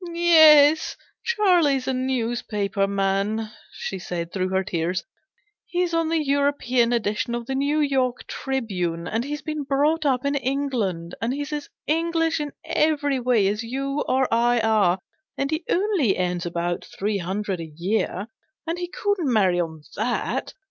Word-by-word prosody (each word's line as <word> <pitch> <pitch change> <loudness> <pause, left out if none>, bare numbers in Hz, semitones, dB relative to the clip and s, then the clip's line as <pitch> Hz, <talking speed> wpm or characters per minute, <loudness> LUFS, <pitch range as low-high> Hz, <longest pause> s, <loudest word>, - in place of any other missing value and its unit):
" - - -6
Yes, 315 -3 +6 0.3
Charlie's 355 - +2
a 265 - +1
news 255 -2 -1
paper 200 -2 -1
man/'* 200 +2 0 0.2
she 190 - -5
said, 170 -2 -5
through 185 -1 -1
her 190 0 +1
tears; 175 +1 -2 0.3
" 415 0 -45
he's 355 -1 -1
on 330 -1 +1
the 320 -2 0
European 275 -4 +2
edition 230 0 0
of 240 -1 -4
the 265 - -3
New 285 +3 +1
York 260 -4 0
Tribune: 180 -11 -3
and 225 +2 -1
he's 295 +2 -5
been 305 -1 -3
brought 290 +3 +1
up 265 -2 +1
in 280 - +1
England; 255 -11 -1
and 235 +3 0
he's 290 +1 -4
as 295 -1 -4 0.2
English 330 +1 +1
in 295 -1 -3
every 290 -3 +1
way 240 -5 +2
as 210 +3 -1
you 275 +4 -2
or 260 0 +2
I 240 +1 +3
are; 215 -5 +3 0.4
and 275 +2 -1
he 315 +2 -1
only 360 - +2
earns 180 -1 -1
about 175 0 -2
three 205 0 0
hundred 190 +1 -3
a 160 -1 -7
year, 195 +1 -1 0.4
and 335 +2 -3
he 355 - -3
couldn't 365 -6 -1
marry 190 -6 +3
on 160 -3 -3
that. 235 +4 -2
255 Hz, 165 wpm, -24 LUFS, 195-295 Hz, 0.4 s, Yes